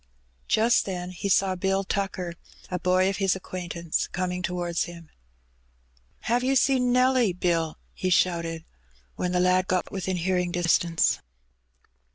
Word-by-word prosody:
Just 230 Hz, +2 st, +3 dB
then 180 Hz, -1 st, -4 dB
he 185 Hz, +2 st, -4 dB
saw 195 Hz, 0 st, +3 dB
Bill 195 Hz, +1 st, 0 dB
Tucker 190 Hz, -3 st, -3 dB, 0.2 s
— -, -, -22 dB
a 180 Hz, -, -1 dB
boy 185 Hz, +1 st, +3 dB
of 195 Hz, -1 st, -1 dB
his 195 Hz, -1 st, +2 dB
acquaintance 175 Hz, -3 st, -3 dB
— -, -, -33 dB
coming 180 Hz, 0 st, -2 dB
towards 175 Hz, -2 st, -1 dB
him. 170 Hz, -2 st, -11 dB, 1.1 s
^^Have 240 Hz, +2 st, +2 dB
yer 265 Hz, +2 st, +1 dB
seen 255 Hz, -1 st, +3 dB
Nelly, 250 Hz, -4 st, +3 dB
Bill?" 170 Hz, -3 st, 0 dB, 0.2 s
he 185 Hz, -, -2 dB
shouted, 170 Hz, -2 st, +1 dB, 0.5 s
when 180 Hz, -, -2 dB
the 180 Hz, -, +1 dB
lad 185 Hz, +1 st, +3 dB
got 185 Hz, -1 st, -1 dB
within 190 Hz, -1 st, -2 dB
hearing 180 Hz, 0 st, 0 dB
distance. 170 Hz, -1 st, +2 dB
180 Hz, 150 wpm, -26 LUFS, 175-195 Hz, 1.1 s, Just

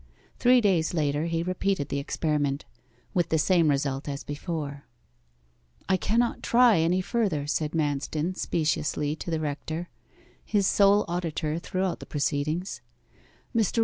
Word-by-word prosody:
Three 250 Hz, 0 st, +5 dB
days 180 Hz, -6 st, +2 dB
later 150 Hz, -1 st, 0 dB
he 165 Hz, 0 st, -1 dB
repeated 185 Hz, -3 st, -1 dB
the 140 Hz, -, -1 dB
experiment; 145 Hz, -1 st, -1 dB, 0.5 s
with 175 Hz, -2 st, +1 dB
the 160 Hz, -, +2 dB
same 165 Hz, 0 st, +3 dB
result 140 Hz, 0 st, -1 dB
as 140 Hz, 0 st, -4 dB
before. 145 Hz, -2 st, -5 dB, 1.0 s
'I 190 Hz, -, +3 dB
cannot 230 Hz, +6 st, +1 dB
try 235 Hz, -6 st, +5 dB
any 175 Hz, +3 st, +2 dB
further,' 190 Hz, -8 st, 0 dB
said 150 Hz, +1 st, -1 dB
Manston 155 Hz, +2 st, -1 dB
speciously 150 Hz, -3 st, -1 dB
to -, -, -6 dB
the 160 Hz, -1 st, 0 dB
rector, 155 Hz, +3 st, -4 dB, 0.5 s
his 205 Hz, -2 st, +1 dB
sole 200 Hz, +1 st, +4 dB
auditor 165 Hz, -2 st, -2 dB
throughout 185 Hz, +1 st, -2 dB
the -, -, -10 dB
proceedings. 150 Hz, +5 st, -2 dB
160 Hz, 130 wpm, -27 LUFS, 145-185 Hz, 1.0 s, Three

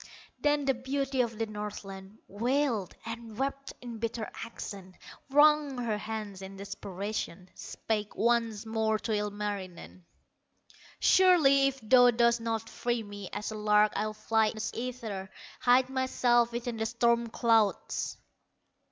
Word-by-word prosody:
Then 295 Hz, -1 st, +2 dB
the 270 Hz, -, +3 dB
beauty 265 Hz, +1 st, -1 dB
of 230 Hz, -2 st, -2 dB
the 225 Hz, -, 0 dB
Northland, 205 Hz, -1 st, -7 dB
Wailed 235 Hz, -2 st, 0 dB
and 230 Hz, -1 st, -7 dB
wept 275 Hz, +1 st, -3 dB
in 235 Hz, -2 st, -7 dB
bitter 225 Hz, -1 st, -3 dB
accents, 195 Hz, -5 st, -8 dB, 0.3 s
Wrung 295 Hz, -1 st, +4 dB
her 225 Hz, -4 st, -1 dB
hands 215 Hz, -2 st, -5 dB
in 195 Hz, 0 st, -9 dB
desperation, 200 Hz, -2 st, -5 dB
Spake 210 Hz, -2 st, -4 dB
once 230 Hz, -2 st, +1 dB
more 220 Hz, -1 st, 0 dB
to 220 Hz, -, -4 dB
Ilmarinen: 205 Hz, -4 st, -4 dB, 1.0 s
"Surely, 305 Hz, -8 st, +5 dB
if 270 Hz, 0 st, -3 dB
thou 245 Hz, +3 st, +6 dB
dost 235 Hz, 0 st, +3 dB
not 225 Hz, -1 st, -2 dB
free 240 Hz, 0 st, -2 dB
me, 205 Hz, -2 st, -8 dB
As 210 Hz, +2 st, -4 dB
a -, -, -5 dB
lark 210 Hz, 0 st, +3 dB
I'll 215 Hz, 0 st, -2 dB
fly 220 Hz, 0 st, +2 dB
the 220 Hz, +1 st, -4 dB
ether, 225 Hz, -6 st, -5 dB, 0.3 s
Hide 250 Hz, +1 st, +4 dB
myself 245 Hz, -2 st, +2 dB
within 235 Hz, 0 st, -4 dB
the 220 Hz, 0 st, -1 dB
storm 235 Hz, 0 st, +2 dB
clouds." 225 Hz, -2 st, +1 dB
225 Hz, 135 wpm, -30 LUFS, 210-245 Hz, 1.0 s, thou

